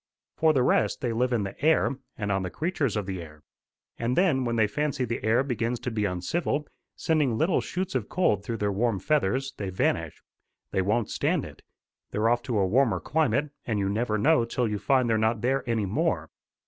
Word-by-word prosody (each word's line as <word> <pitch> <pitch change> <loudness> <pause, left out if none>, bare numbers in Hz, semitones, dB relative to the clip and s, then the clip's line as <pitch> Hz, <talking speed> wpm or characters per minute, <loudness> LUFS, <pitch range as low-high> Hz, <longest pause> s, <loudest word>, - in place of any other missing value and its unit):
For 160 0 +4
the 135 -5 +2
rest, 105 -4 +2
they 120 -3 -1
live 125 +2 +1
in 115 -4 +1
the 100 +6 -7
air, 160 +1 +4 0.3
and 105 -1 -2
on 95 0 +1
the 90 - -3
creatures 155 - -1
of 105 - -2
the 95 -2 -4
air. 75 -2 -12 0.6
And 120 +2 -1
then, 160 -9 +3
when 115 -1 -1
they 110 -1 +4
fancy 140 +3 -1
the 115 -2 -4
air 115 +4 +3
begins 120 -2 -2
to 125 - -3
be 105 -2 0
uncivil, 140 - -1 0.3
sending 150 -8 +1
little 170 +7 +2
shoots 185 +1 -3
of 125 -6 -2
cold 105 - +1
through 115 +2 -3
their 105 -1 0
warm 110 +1 +1
feathers, 135 +1 0
they 100 -2 -3
vanish. 85 -3 -1 0.5
They 95 - +1
won't 105 +4 0
stand - - 0
it. - - -12 0.5
They're 110 +2 +1
off 120 0 +2
to 115 - +1
a 100 - +3
warmer 120 +5 +2
climate, 150 -2 0
and 110 -3 -2
you 100 -1 0
never 110 +1 0
know 150 +4 +4
till 115 +1 -1
you 105 -1 -2
find 130 +4 +2
they're 110 -1 +2
not 110 0 +1
there 135 +3 +1
any 110 -3 +1
more. 95 +3 -1
115 Hz, 210 wpm, -27 LUFS, 105-135 Hz, 0.6 s, For